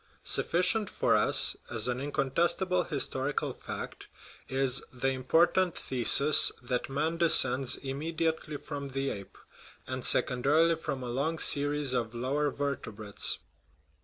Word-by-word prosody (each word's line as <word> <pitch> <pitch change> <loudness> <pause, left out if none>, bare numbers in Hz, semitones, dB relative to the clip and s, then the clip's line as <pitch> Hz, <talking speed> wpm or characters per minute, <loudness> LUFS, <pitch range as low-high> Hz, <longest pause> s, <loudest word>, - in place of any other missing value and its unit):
Sufficient 185 +5 0
for - - 0
us, - - +2
as - - -3
an 125 +1 -3
incontestable 165 +6 -1
his 145 -5 -1
torical 135 +2 -4
fact, - - -9 0.4
is 135 0 +1
the 130 +1 -2
important 165 +7 0
thesis 135 +4 +6
that 125 +1 -4
man 155 +5 -3
descends 135 -6 +4
immediately 155 +2 -4
from 140 -1 -8
the 135 +1 -3
ape, 100 -2 -10 0.5
and 130 -1 -6
secondarily 150 +7 +3
from 135 -5 -6
a - - -6
long 140 +7 -3
series 145 -2 +1
of 120 -2 -3
lower 140 +5 -2
vertebrates. 115 -8 -4
140 Hz, 125 wpm, -28 LUFS, 130-160 Hz, 0.5 s, thesis